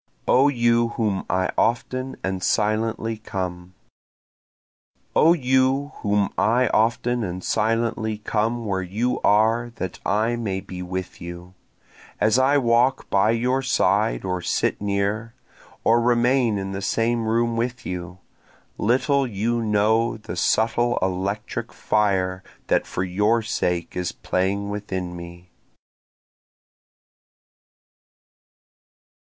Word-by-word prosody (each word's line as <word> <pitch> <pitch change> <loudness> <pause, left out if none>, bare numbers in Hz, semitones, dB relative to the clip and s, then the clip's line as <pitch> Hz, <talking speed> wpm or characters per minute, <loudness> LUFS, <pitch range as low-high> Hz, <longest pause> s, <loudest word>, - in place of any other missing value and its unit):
O 135 +3 +5
You 120 -3 +2
Whom 105 -4 -1
I 95 0 +1
Often 130 +3 -1
and 95 -1 -2
Silently 110 +1 0
Come 90 -4 -5 1.4
O 165 +2 +6
you 130 -1 +1
whom 105 -2 0
I 120 +2 +3
often 115 +2 +1
and 90 -1 -4
silently 110 -1 0
come 110 +2 -1
where 95 -2 -1
you 110 +7 -1
are 115 +3 +3
that 95 -1 -5
I 110 +4 +1
may 100 -5 -2
be 90 -1 -8
with 90 0 -5
you, 85 +1 -8 0.7
As 110 +4 +3
I 135 +2 +4
walk 120 0 +2
by 100 +2 +3
your 125 +3 +1
side 95 - +1
or 90 -1 -2
sit - - -1
near, 105 +3 -1 0.5
or 115 +1 +4
remain 120 -1 +2
in 95 0 -4
the 95 0 -4
same 115 +2 0
room 115 +1 +1
with 120 +2 -3
you, 90 0 -5 0.6
Little 135 +4 +2
you 115 +2 -1
know 110 +2 +2
the 105 - -7
subtle 115 +6 +1
electric 95 +3 -3
fire 95 -3 0 0.3
that - - +2
for 90 - -2
your 105 +5 +1
sake 90 -5 -2
is 90 -1 -2
playing 100 +2 -1
within 95 -4 -4
me. 85 +1 -11
110 Hz, 115 wpm, -23 LUFS, 95-120 Hz, 1.4 s, O